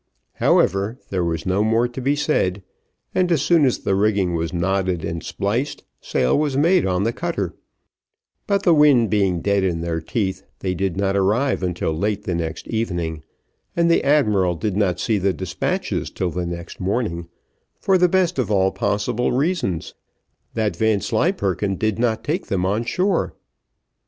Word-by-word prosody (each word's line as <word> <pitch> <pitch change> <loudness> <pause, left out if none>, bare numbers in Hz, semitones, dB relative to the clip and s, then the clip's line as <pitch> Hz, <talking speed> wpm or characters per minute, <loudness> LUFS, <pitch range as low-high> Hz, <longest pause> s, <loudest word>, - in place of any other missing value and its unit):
However, 100 +6 +2
there 95 -2 0
was 85 -1 -2
no 95 +2 +1
more 115 +2 +2
to 120 +2 -7
be 140 +3 +1
said; 100 -11 0 0.5
and 180 -1 +1
as 155 -5 +2
soon 165 -3 +4
as 130 - +2
the 100 - -1
rigging 100 -3 +1
was 80 -1 -2
knotted 95 -1 0
and 85 -1 -4
spliced, 115 +9 -2 0.2
sail 65 - +1
was 145 -3 0
made 170 +5 +4
in 90 0 0
the 115 +2 0
cutter; 170 +5 -3 0.9
but 200 -2 +1
the 175 - +5
wind 145 -7 +5
being 95 -5 +1
dead 100 +1 +1
in 85 -3 0
their 85 -1 -2
teeth, 95 +1 -2 0.2
they 95 -1 -2
did 95 0 -2
not 100 0 0
arrive 110 +8 +1
until 90 -3 -1
late 105 +4 -1
the 95 - -2
next 85 -1 -4
evening, 85 -9 -2 0.5
and 170 0 +3
the - - +3
admiral 105 -11 +3
did 100 +3 -2
not 95 -4 +1
see 110 +1 +1
despatches 95 - -2
till 90 -3 -2
the 90 +1 -3
next 85 0 -7
morning, 95 -4 -2 0.5
for 195 - +2
the 180 0 +4
best 180 -3 +1
of 125 - 0
all 95 -2 +3
possible 115 +4 -1
reasons, 130 - -1 0.6
that 105 -5 0
Vanslyperken 100 - 0
did 110 +2 -1
not 115 -2 0
take 165 +6 -2
them 95 -2 0
on 105 +5 0
shore. 185 +6 0
100 Hz, 165 wpm, -21 LUFS, 90-130 Hz, 0.9 s, the